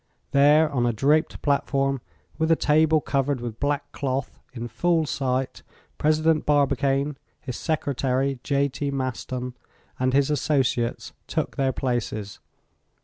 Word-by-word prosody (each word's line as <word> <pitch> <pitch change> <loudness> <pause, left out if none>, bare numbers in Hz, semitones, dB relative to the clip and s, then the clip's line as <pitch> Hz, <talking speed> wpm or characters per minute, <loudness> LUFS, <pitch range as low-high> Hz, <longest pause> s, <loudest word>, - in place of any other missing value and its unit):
There, 150 +3 +5
on 125 -3 +1
a 120 - +1
draped 150 +8 +1
platform, 135 -2 +1 0.4
with 160 0 +1
a - - +7
table 155 0 +3
covered 140 -1 0
with 120 -2 -6
black 145 0 -1
cloth, 135 0 -3
in 120 -2 -6
full 160 +8 +1
sight, 130 -2 -2 0.4
President 155 +1 +2
Barbicane, 140 -1 +1 0.2
his 125 -3 -6
Secretary, 135 -4 -1
J.T. 140 0 0
Maston, 130 -1 -3 0.5
and 130 0 +2
his 140 +1 +3
associates, 135 -5 0
took - - -2
their 135 -1 +1
places. 120 -6 -3
140 Hz, 125 wpm, -25 LUFS, 130-150 Hz, 0.5 s, a